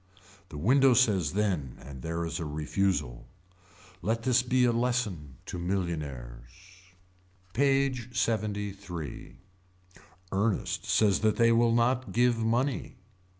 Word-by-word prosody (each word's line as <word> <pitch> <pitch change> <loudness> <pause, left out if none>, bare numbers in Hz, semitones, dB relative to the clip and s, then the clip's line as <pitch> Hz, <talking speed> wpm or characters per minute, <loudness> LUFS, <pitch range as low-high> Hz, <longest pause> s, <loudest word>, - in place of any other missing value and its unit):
The 75 - -8
window 130 - +4
says 100 - +2
then 95 -11 -1
and 65 -1 -10
there 85 +4 -3
is 80 +1 -4
a - - -3
refusal. 75 -5 -2 0.7
Let 115 +5 -1
this 125 0 +3
be 125 0 +2
a 120 - +3
lesson 115 - -1
to 90 - -6
millionaires. 75 -10 -4 1.0
PAGE 135 -1 +1
LXXIII. 100 - -3 0.9
Ernest 100 +2 -1
says 105 -4 +3
that 110 -1 +2
they 115 0 +4
will 115 0 +3
not 120 +1 +1
give 120 -1 +3
money. 120 +4 -1
105 Hz, 115 wpm, -29 LUFS, 85-120 Hz, 1.0 s, window